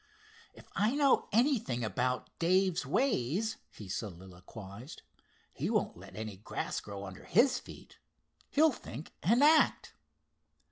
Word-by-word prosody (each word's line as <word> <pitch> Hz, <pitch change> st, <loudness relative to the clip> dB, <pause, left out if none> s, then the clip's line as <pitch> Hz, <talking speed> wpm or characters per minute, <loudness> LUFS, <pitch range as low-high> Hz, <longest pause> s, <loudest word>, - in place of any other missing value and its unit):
"If -, -, -15 dB
I 215 Hz, +6 st, +2 dB
know 285 Hz, -2 st, +3 dB
anything 215 Hz, -, +2 dB
about 125 Hz, +5 st, -1 dB
Dave's 185 Hz, +1 st, +2 dB
ways," 220 Hz, -, 0 dB
he 105 Hz, -, -11 dB
soliloquized, 95 Hz, -, -8 dB, 0.5 s
"he -, -, -2 dB
won't -, -, 0 dB
let 95 Hz, +1 st, -13 dB
any 110 Hz, -2 st, -6 dB
grass 100 Hz, -, -4 dB
grow 100 Hz, -1 st, -7 dB
under 95 Hz, -1 st, -10 dB
his 245 Hz, +5 st, +4 dB
feet. -, -, -13 dB, 0.5 s
He'll 310 Hz, +2 st, +4 dB
think 150 Hz, -, -9 dB
and 235 Hz, +9 st, +4 dB
act. 310 Hz, +1 st, +4 dB
135 Hz, 125 wpm, -32 LUFS, -, 0.5 s, his